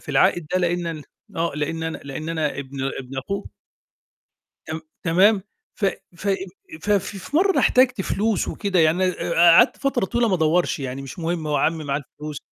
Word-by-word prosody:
في -, -, -20 dB
العائد 175 Hz, -3 st, +3 dB
ده، 185 Hz, -, +3 dB
لإن 175 Hz, -1 st, 0 dB
أن 160 Hz, -2 st, -4 dB, 0.3 s
آه، 165 Hz, +1 st, 0 dB
لإن 150 Hz, +2 st, -2 dB
أنا 160 Hz, 0 st, -3 dB
لإن 145 Hz, +3 st, -6 dB
أنا 155 Hz, -4 st, -1 dB
ابن 135 Hz, 0 st, -6 dB, 0.2 s
ابن 135 Hz, +1 st, -7 dB
أخوه. 200 Hz, +9 st, -4 dB, 1.2 s
تم 160 Hz, 0 st, -5 dB, 0.2 s
تمام، 190 Hz, +4 st, +4 dB, 0.4 s
ف 215 Hz, -, -1 dB, 0.3 s
ف 200 Hz, +4 st, -4 dB, 0.5 s
ف 210 Hz, -, -3 dB
في 200 Hz, +6 st, -1 dB
مرّة 385 Hz, +4 st, +4 dB
أنا -, -, +2 dB
احتجت 250 Hz, -3 st, +4 dB
فلوس 210 Hz, +2 st, 0 dB
وكده 195 Hz, -3 st, -1 dB
يعني 165 Hz, +3 st, +4 dB
آآ 180 Hz, -2 st, -1 dB, 0.2 s
قعدت 245 Hz, -, +6 dB
فترة 275 Hz, -7 st, 0 dB
طويلة 235 Hz, +4 st, +1 dB
ما 190 Hz, -, +2 dB
أدوّرش، 170 Hz, +1 st, +2 dB
يعني 135 Hz, 0 st, -4 dB
مش 135 Hz, +5 st, -9 dB
مهم 165 Hz, -1 st, -2 dB
هو 150 Hz, -1 st, 0 dB
عمّي 160 Hz, 0 st, 0 dB
معاه 140 Hz, 0 st, -1 dB
الفلوس. 150 Hz, -1 st, -7 dB
170 Hz, 180 wpm, -23 LUFS, 150-195 Hz, 1.2 s, قعدت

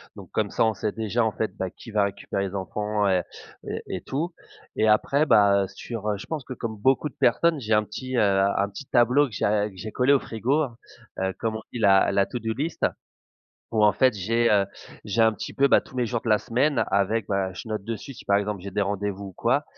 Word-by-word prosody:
Donc -, -, -11 dB
comme -, -, 0 dB
ça, -, -, +2 dB
on 110 Hz, -, +2 dB
sait 105 Hz, -, -2 dB
déjà 110 Hz, +2 st, 0 dB
en 110 Hz, -, +1 dB
fait, 110 Hz, -, -3 dB
bah, 95 Hz, -, -2 dB
qui -, -, -13 dB
va 105 Hz, -1 st, +2 dB
récupérer 100 Hz, 0 st, -3 dB
les 95 Hz, -, -7 dB
enfants 105 Hz, +2 st, -1 dB
et 95 Hz, -2 st, +3 dB, 0.5 s
et -, -, -4 dB, 0.2 s
et -, -, -8 dB
tout 160 Hz, +6 st, -3 dB, 0.4 s
et 110 Hz, -, +2 dB
après, 140 Hz, +7 st, +3 dB
bah, 100 Hz, -6 st, +5 dB
heu, -, -, -3 dB
sur, 110 Hz, 0 st, -6 dB
heu 105 Hz, -, 0 dB
je 100 Hz, -, -9 dB
pense 155 Hz, -4 st, -4 dB
que 130 Hz, -, -7 dB
comme 115 Hz, -3 st, -5 dB
beaucoup 135 Hz, +7 st, +2 dB
de -, -, -24 dB
personnes 160 Hz, +6 st, +3 dB
j'ai 110 Hz, -4 st, -1 dB
un 105 Hz, 0 st, +4 dB
petit, 130 Hz, +5 st, -6 dB
heu, -, -, +4 dB
un 100 Hz, 0 st, +2 dB
petit 100 Hz, +8 st, -9 dB
tableau 125 Hz, +4 st, +4 dB
que 125 Hz, -, -14 dB
j'ai -, -, -1 dB
a 105 Hz, 0 st, +1 dB
que 95 Hz, -, -16 dB
j'ai 110 Hz, +3 st, -6 dB
collé 130 Hz, +5 st, +3 dB
au 140 Hz, -, +4 dB
frigo, 130 Hz, +8 st, 0 dB
hein. 130 Hz, -6 st, -3 dB, 0.4 s
Heu, 95 Hz, 0 st, -1 dB
comme 110 Hz, -1 st, -1 dB
on 110 Hz, -, -5 dB
dit 120 Hz, -, -4 dB
la 100 Hz, -3 st, +5 dB
la 100 Hz, -, +3 dB
to 125 Hz, -, -4 dB
do 115 Hz, 0 st, -2 dB
list 155 Hz, +7 st, -2 dB, 0.9 s
où 110 Hz, -2 st, +1 dB
en 105 Hz, -, +6 dB
fait 130 Hz, -1 st, +3 dB
j'ai, 115 Hz, +4 st, +1 dB
heu, 100 Hz, -2 st, +4 dB, 0.4 s
j'ai 110 Hz, +3 st, +2 dB
un 110 Hz, 0 st, +5 dB
petit -, -, -7 dB
peu, 140 Hz, -, +4 dB
bah, -, -, +5 dB
tous 130 Hz, -, -14 dB
les 125 Hz, -, +1 dB
jours 120 Hz, 0 st, -2 dB
de -, -, -4 dB
la 110 Hz, -, +5 dB
semaine 135 Hz, +7 st, +1 dB
avec 100 Hz, +2 st, +1 dB
ben, 95 Hz, -2 st, 0 dB
je 110 Hz, -, -8 dB
note 110 Hz, -2 st, -3 dB
dessus 115 Hz, +5 st, -5 dB
si -, -, -13 dB
par 100 Hz, -, +4 dB
exemple 105 Hz, -1 st, -2 dB
j'ai 100 Hz, -, -6 dB
des 100 Hz, +2 st, 0 dB
rendez-vous 100 Hz, 0 st, -3 dB
ou -, -, -11 dB
quoi -, -, +1 dB
110 Hz, 260 wpm, -25 LUFS, 100-120 Hz, 0.9 s, en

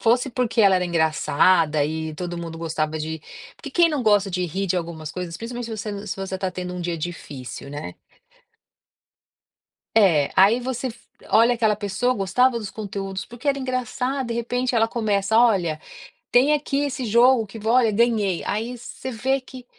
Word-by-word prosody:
fosse 245 Hz, +3 st, +2 dB
porque 240 Hz, -2 st, 0 dB
ela 195 Hz, -2 st, +6 dB
era 180 Hz, -, 0 dB
engraçada 160 Hz, -1 st, +2 dB
e 160 Hz, 0 st, -3 dB
todo 175 Hz, +1 st, -5 dB
mundo 165 Hz, -1 st, -6 dB
gostava 155 Hz, -1 st, -2 dB
de 160 Hz, 0 st, -4 dB, 0.4 s
porque -, -, -9 dB
quem 345 Hz, -1 st, +4 dB
não 290 Hz, -4 st, -1 dB
gosta 205 Hz, -3 st, +3 dB
de 180 Hz, 0 st, -1 dB
rir 195 Hz, +5 st, -3 dB
de 185 Hz, -, 0 dB
algumas 160 Hz, -3 st, -5 dB
coisas, 180 Hz, -2 st, -5 dB
principalmente 240 Hz, +1 st, -6 dB
se 220 Hz, -1 st, -5 dB
você 205 Hz, 0 st, -5 dB
se 190 Hz, -, -4 dB
você 195 Hz, 0 st, -5 dB
está 190 Hz, 0 st, -2 dB
tendo 180 Hz, 0 st, -5 dB
um 180 Hz, -, -5 dB
dia 170 Hz, -1 st, -2 dB
difícil, 140 Hz, -6 st, -7 dB
né? 145 Hz, +1 st, -6 dB, 2.0 s
É, 170 Hz, -10 st, +4 dB
aí 205 Hz, +6 st, +6 dB
você 260 Hz, +1 st, -3 dB
f 235 Hz, -1 st, -9 dB, 0.3 s
olha 230 Hz, +2 st, +5 dB
aquela 220 Hz, -3 st, +2 dB
pessoa, 210 Hz, +5 st, 0 dB
gostava 235 Hz, +5 st, +2 dB
dos 205 Hz, -4 st, -6 dB
conteúdos 195 Hz, -2 st, -5 dB
porque 240 Hz, +4 st, -14 dB
era 275 Hz, -1 st, +2 dB
engraçada, 255 Hz, +1 st, -2 dB
de 235 Hz, -, -3 dB
repente 245 Hz, +2 st, -1 dB
ela 225 Hz, -1 st, +3 dB
começa: 215 Hz, -2 st, 0 dB
"Olha, 185 Hz, -10 st, +3 dB, 0.5 s
tem 260 Hz, +5 st, +4 dB
aqui 285 Hz, -1 st, 0 dB
esse 265 Hz, -3 st, -3 dB
jogo 235 Hz, +1 st, +4 dB
que 210 Hz, +3 st, -10 dB
v 220 Hz, -, -6 dB
olha, 235 Hz, -2 st, +4 dB
ganhei". 210 Hz, -5 st, +1 dB
Aí 230 Hz, +4 st, -2 dB
você 250 Hz, +2 st, -8 dB
vê 260 Hz, +4 st, 0 dB
que 255 Hz, -1 st, -12 dB
210 Hz, 180 wpm, -23 LUFS, 175-245 Hz, 2.0 s, ela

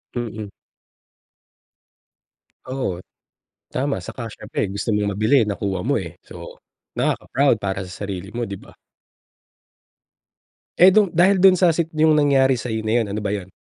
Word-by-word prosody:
Mm. 110 Hz, -3 st, -5 dB, 2.2 s
Oo, 130 Hz, -9 st, -3 dB, 0.7 s
tama. 140 Hz, +1 st, -2 dB
Tsaka 115 Hz, -2 st, -7 dB
siyempre 105 Hz, -, -4 dB
gusto 100 Hz, +2 st, -5 dB
mong 105 Hz, -1 st, 0 dB
mabili, 110 Hz, +6 st, +3 dB
nakuha 100 Hz, -2 st, -3 dB
mo, 135 Hz, -1 st, +1 dB
eh, 85 Hz, -4 st, -9 dB
so -, -, -11 dB, 0.4 s
nakaka-proud 135 Hz, -2 st, +1 dB
para 100 Hz, -1 st, -3 dB
sa 90 Hz, -, -10 dB
sarili 95 Hz, 0 st, -6 dB
mo, 120 Hz, 0 st, -3 dB
'di 100 Hz, -, -5 dB
ba? -, -, -16 dB, 2.1 s
Eh, 185 Hz, +1 st, +7 dB
do'n 210 Hz, -2 st, +4 dB
dahil 180 Hz, +3 st, +3 dB
do'n 190 Hz, -1 st, +7 dB
sa 175 Hz, -2 st, +4 dB
sit 165 Hz, 0 st, -1 dB
'yung 155 Hz, 0 st, +4 dB
nangyari 140 Hz, -3 st, +4 dB
sa'yo 115 Hz, -3 st, -4 dB
na 115 Hz, +2 st, +2 dB
'yun 105 Hz, -, -4 dB
ano 100 Hz, -, -4 dB
ba 105 Hz, -1 st, -2 dB
yun? 95 Hz, -3 st, -5 dB
115 Hz, 145 wpm, -21 LUFS, 100-145 Hz, 2.2 s, Eh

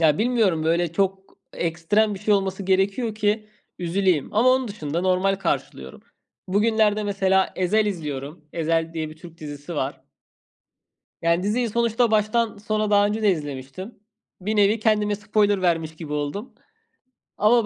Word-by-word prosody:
ya 155 Hz, -2 st, +4 dB
bilmiyorum, 215 Hz, -9 st, +2 dB
böyle 170 Hz, 0 st, +1 dB
çok 195 Hz, +1 st, -2 dB, 0.2 s
ekstrem 175 Hz, +6 st, +1 dB
bir -, -, -7 dB
şey 210 Hz, +1 st, +2 dB
olması 195 Hz, 0 st, -1 dB
gerekiyor 195 Hz, +4 st, +1 dB
ki, 215 Hz, 0 st, 0 dB, 0.3 s
üzüleyim 180 Hz, -2 st, 0 dB
ama 235 Hz, +4 st, +4 dB
onun 255 Hz, -1 st, +3 dB
dışında 165 Hz, -6 st, -3 dB
normal 185 Hz, +1 st, +2 dB
karşılıyorum. 70 Hz, -, -4 dB, 0.5 s
Bugünlerde, 215 Hz, +1 st, +2 dB
mesela, 190 Hz, -1 st, +1 dB
Ezel 210 Hz, +4 st, +2 dB
izliyorum. 150 Hz, -4 st, -5 dB
Ezel 165 Hz, 0 st, 0 dB
diye 160 Hz, -2 st, -4 dB
bir 155 Hz, -, -12 dB
Türk 165 Hz, 0 st, -13 dB
dizisi 145 Hz, +2 st, -7 dB
var. 140 Hz, -1 st, -3 dB, 1.2 s
Yani, 170 Hz, +2 st, +2 dB
diziyi 230 Hz, +4 st, 0 dB
sonuçta 235 Hz, +1 st, +1 dB
baştan 215 Hz, +1 st, +1 dB
sona 215 Hz, 0 st, -1 dB
daha 205 Hz, 0 st, +5 dB
önce 210 Hz, +2 st, -1 dB
de 205 Hz, -, +5 dB
izlemiştim. 145 Hz, -, -6 dB, 0.4 s
Bir 210 Hz, +4 st, -1 dB
nevi 210 Hz, +2 st, +3 dB
kendime 210 Hz, -1 st, +2 dB
spoiler 205 Hz, -1 st, +1 dB
vermiş 165 Hz, -3 st, 0 dB
gibi 155 Hz, -3 st, -7 dB
oldum 150 Hz, -, -4 dB, 0.8 s
ama 225 Hz, +2 st, +4 dB
195 Hz, 145 wpm, -23 LUFS, 165-215 Hz, 1.2 s, daha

